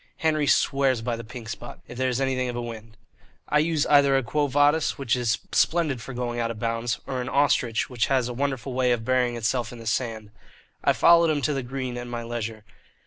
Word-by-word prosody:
Henry 155 -2 +1
swears 135 -5 +2
by 120 0 -1
the 115 - -7
"Pink 115 0 -9
Spot" 115 +2 -7
if - - -9
there 130 +1 0
is 125 0 -1
anything 130 -2 0
of 120 - -4
a 120 - -2
wind. 115 -1 -9 0.5
I 150 - +3
use 155 -1 +1
either 140 -2 +5
a 135 - 0
"Quo 145 +6 0
Vadis," 145 +3 +2
which 135 -4 0
is 120 -2 +1
splendid 160 -7 +1
for 110 - -8
going 120 -1 -3
out 115 -1 0
of 115 - -5
bounds, 115 0 -2
or 130 -2 -3
an 125 - -4
"Ostrich," 130 -5 +2
which 120 -3 -1
has 130 -3 +1
a 125 - -4
wonderful 135 0 -2
way 125 -1 +2
of 110 -2 -3
burying 125 -1 +1
itself 120 0 -1
in 120 - -9
the 115 - -11
sand. 110 -2 -2 0.5
I - - +4
followed 170 -1 +5
him 145 -3 0
to 150 - +1
the 135 - -1
green 130 -1 -5
at 120 - -6
my 120 -1 -5
leisure. 115 -2 -5
125 Hz, 230 wpm, -25 LUFS, 115-140 Hz, 0.5 s, either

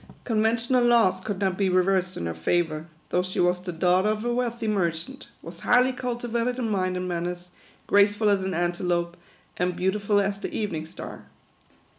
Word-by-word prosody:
Conventional 230 +2 +2
laws 230 -6 +4
could 205 0 -3
not 190 -1 0
be 195 -1 +2
reversed 185 0 +1
in - - -3
her 85 - -2
favour, 155 - -1 0.2
though 180 - +2
she 185 0 -4
was 180 0 +2
the 180 0 -5
daughter 180 +4 +2
of 215 +1 -2
a 240 - +1
weal 245 0 +1
thy 230 0 -7
merchant, 170 -6 -2 0.2
was 170 +1 -9
highly 250 +4 +4
cultivated 245 -1 -2
in 245 -3 -1
mind 185 -2 0
and 180 0 -3
man 175 -1 -2
ners, 180 0 -6 0.4
graceful 205 +1 +3
as 200 -2 +3
an 190 -1 -2
antelope, 175 0 -1 0.4
and 180 0 0
beautiful 200 +3 +1
as 200 0 -1
the - - -5
eve 210 -2 -2
ning 160 -1 -4
star. - - -9
190 Hz, 190 wpm, -25 LUFS, 175-220 Hz, 0.4 s, laws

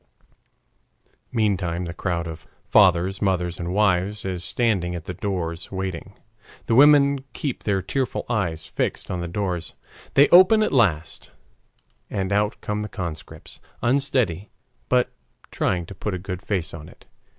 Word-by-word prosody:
Meantime 95 -7 0
the 85 - -5
crowd 85 -1 -2
of 80 -1 -8 0.2
fathers, 95 -1 +4
mothers, 90 -3 0
and 85 0 -3
wives 100 0 +1
is 90 -2 -3
standing 90 -3 0
at 85 - -6
the 90 - -5
doors 85 -3 -4
waiting. 95 0 -5 0.5
The - - 0
women 140 +1 +6
keep 140 -5 -4
their 95 -3 +1
tearful 130 +6 -2
eyes 85 -9 -1
fixed - - -3
on 90 -1 -2
the 85 - -3
doors. 90 -2 -3 0.4
They 140 +1 +7
open 185 +5 +7
at - - -1
last, 85 - +1 0.8
and 95 0 -2
out 105 +1 +1
come 105 0 -2
the 105 - -5
conscripts, 85 -7 -7 0.2
unsteady, 120 - +1 0.4
but 125 -1 +2 0.4
trying 90 -1 0
to 100 - -9
put 100 +1 -4
a - - -2
good 90 0 -6
face 95 -7 -2
on 80 -1 -9
it. - - -19
95 Hz, 150 wpm, -23 LUFS, 85-110 Hz, 0.8 s, They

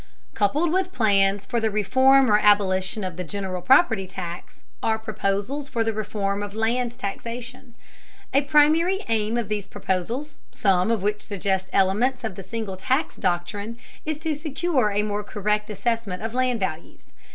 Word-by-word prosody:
Coupled 295 +11 +1
with 370 0 +1
plans 200 - +2
for 235 +3 -1
the 220 -1 +1
reform 260 +5 +4
or 210 - +6
abolition 200 0 +3
of 185 -3 -5
the 180 - -3
general 185 0 -4
property 225 - +4
tax 180 -2 -7 0.2
are 220 0 +1
proposals 220 +6 -2
for 230 -3 0
the 225 0 -1
reform 205 -2 -2
of 205 0 -6
land 235 +2 0
taxation. 245 +3 -6 0.6
A 275 - +5
primary 310 +6 +4
aim 220 0 +1
of 235 -3 -1
these 205 -2 -3
proposals, 210 +10 -3
some 190 -1 +2
of 225 -4 0
which 210 +1 0
suggest 190 -2 -2
elements 240 +7 +2
of 220 -3 -3
the 195 - -8
single 210 -1 -5
tax 260 - 0
doctrine, 200 +6 -2 0.3
is 310 -1 -2
to 320 0 -2
secure 295 -4 0
a 205 +1 +1
more 210 0 -2
correct 210 +1 -1
assessment 210 -2 -2
of 225 0 -3
land 250 -2 +1
values. 170 -4 -5
215 Hz, 165 wpm, -24 LUFS, 195-255 Hz, 0.6 s, or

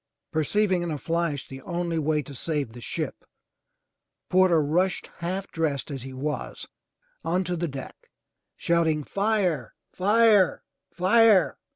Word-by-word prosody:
Perceiving 185 +4 +1
in 175 - -3
a 155 - -2
flash 165 -2 -2
the 135 0 -9
only 170 -2 -2
way 150 0 +1
to 140 - -10
save 145 -3 -2
the 120 - -10
ship, - - -4 1.1
Porter 185 -3 +5
rushed, 175 +6 0
half 185 +3 -4
dressed 150 -4 -1
as 135 -2 -5
he 135 +2 -8
was, 145 +3 -4 0.6
onto 180 +1 0
the 170 0 -2
deck, 135 -3 -9 0.5
shouting, 160 -3 +1
*Tire! 195 - 0 0.2
Fire! 205 -1 +4 0.3
Fire!'' 200 +1 +4
170 Hz, 130 wpm, -26 LUFS, 150-185 Hz, 1.1 s, Porter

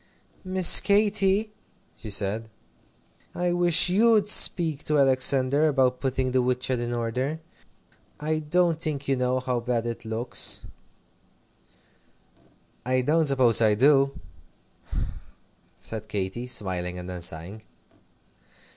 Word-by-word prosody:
"Miss 185 -2 +8
Katy," 205 0 +1 0.4
she 110 - -11
said, 105 +2 0 0.9
"I 175 0 -2
wish 175 -1 +5
you'd 210 +2 +2
speak 160 -7 +3
to 150 - 0
Alexander 135 +2 +2
about 130 -3 0
putting 130 -1 -3
the 130 0 +1
woodshed 125 0 -2
in 120 0 -5
order. 125 +6 -4 0.8
I 155 +1 -3
don't 165 +1 -1
think 145 -4 -5
you 135 - 0
know 125 0 -1
how 125 -1 -3
bad 120 -1 -3
it 120 0 -6
looks." 115 +2 -4 2.2
"I 130 +1 -1
don't 155 +4 0
suppose 130 -5 +3
I 110 -2 +3
do," 135 +3 +2 1.6
said 110 -1 -8
Katy, 105 +4 -5
smiling, 90 -6 -3
and 90 0 -9
then 90 -1 -7
sighing. 85 +6 -6
130 Hz, 115 wpm, -24 LUFS, 115-155 Hz, 2.2 s, Miss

